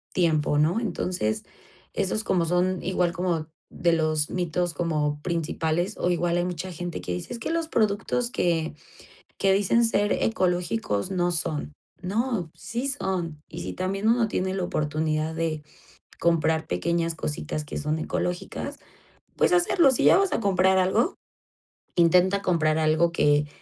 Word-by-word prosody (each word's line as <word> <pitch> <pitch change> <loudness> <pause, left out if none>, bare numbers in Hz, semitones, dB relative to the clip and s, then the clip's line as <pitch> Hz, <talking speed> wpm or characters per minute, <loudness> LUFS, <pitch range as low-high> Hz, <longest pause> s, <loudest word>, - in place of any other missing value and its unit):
tiempo, 155 -4 +2
¿no?, 160 +8 +3
entonces 180 - -2 0.5
esos 215 +3 0
como 175 -5 +1
son 180 +2 +1
igual 180 -1 +1
como 170 -3 -1 0.2
de 170 - +1
los 155 -2 +1
mitos 175 -1 0
como 150 -4 -1
principales, 170 +2 -1
o 180 - 0
igual 175 0 +1
hay 175 - +1
mucha 180 +1 -4
gente 175 0 -5
que 90 - -5
dice: 90 - -5
"Es - - -5
que 225 - -3
los 330 -1 -1
productos 225 0 0
que 165 -6 0 0.7
que 195 - +3
dicen 205 +4 +3
ser 205 -2 +1
ecológicos 180 - 0
no 175 -1 +1
son", 155 -3 -2 0.3
no, 205 -2 -1
sí 240 +4 -4
son, 185 - -2
y 170 +2 -7
si - - -5
también 195 +3 -2
uno 230 -1 +3
tiene 190 -2 -1
la 190 - -2
oportunidad 155 0 -1
de 160 -2 -2 0.6
comprar 160 -1 +2
pequeñas 165 - 0
cositas 150 0 -3
que 145 - -7
son 150 +2 -1
ecológicas, 180 +2 -3 0.6
pues, - - +3
hacerlo, 350 -3 +4
si 255 - +1
ya - - +7
vas 390 -1 +2
a - - +1
comprar, 190 -3 +3
algo 215 - +2 0.8
intenta 180 +3 +4
comprar 160 -5 +2
algo 160 +2 +3
que 145 -2 +3
175 Hz, 150 wpm, -25 LUFS, 160-190 Hz, 0.8 s, ya